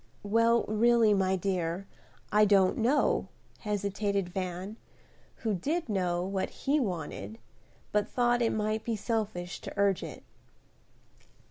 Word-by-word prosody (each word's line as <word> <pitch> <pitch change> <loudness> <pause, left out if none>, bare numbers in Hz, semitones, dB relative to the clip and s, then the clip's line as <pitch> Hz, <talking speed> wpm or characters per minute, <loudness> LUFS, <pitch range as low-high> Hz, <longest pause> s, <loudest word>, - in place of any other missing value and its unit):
"Well, 230 +3 +3
really, 225 0 +4
my 190 -1 +2
dear, 185 -1 -2 0.5
I 210 +1 +5
don't 195 -1 +4
know," 255 +6 +2 0.3
hesitated 200 -2 -1
Van, 185 +3 -4 0.7
who 220 - +2
did 300 - -2
know 180 -3 0
what 190 0 -2 0.2
he 285 +2 +3
wanted, 200 - -4 0.5
but 210 -1 +1
thought 240 -1 +2
it 230 - +2
might 215 0 -1
be 230 - -1
selfish 205 -5 -3
to - - -7
urge 200 -3 +2
it. - - -8
205 Hz, 125 wpm, -30 LUFS, 190-225 Hz, 0.7 s, I